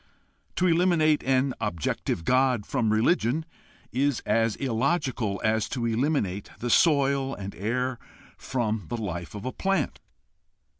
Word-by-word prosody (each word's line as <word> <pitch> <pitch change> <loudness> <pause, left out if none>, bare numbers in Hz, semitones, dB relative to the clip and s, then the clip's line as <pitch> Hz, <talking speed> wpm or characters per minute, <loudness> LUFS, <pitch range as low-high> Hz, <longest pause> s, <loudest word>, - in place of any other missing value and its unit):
To 180 - +1
eliminate 165 -3 +3
an 130 0 +2
objective 80 0 -2
God 130 -4 +2
from 110 -2 0
religion 120 +5 +2 0.5
is 135 +1 +1
as 115 +1 +1
illogical 130 - -1
as 110 -1 +1
to 120 -2 -2
eliminate 115 - 0
the 120 0 -2
soil 140 -3 +3
and 100 0 -7
air 125 +4 -2 0.4
from 110 -5 -2
the 120 - -3
life 90 -4 -5
of 105 - -7
a 130 - -2
plant. 195 -4 -1
125 Hz, 130 wpm, -26 LUFS, 110-140 Hz, 0.5 s, eliminate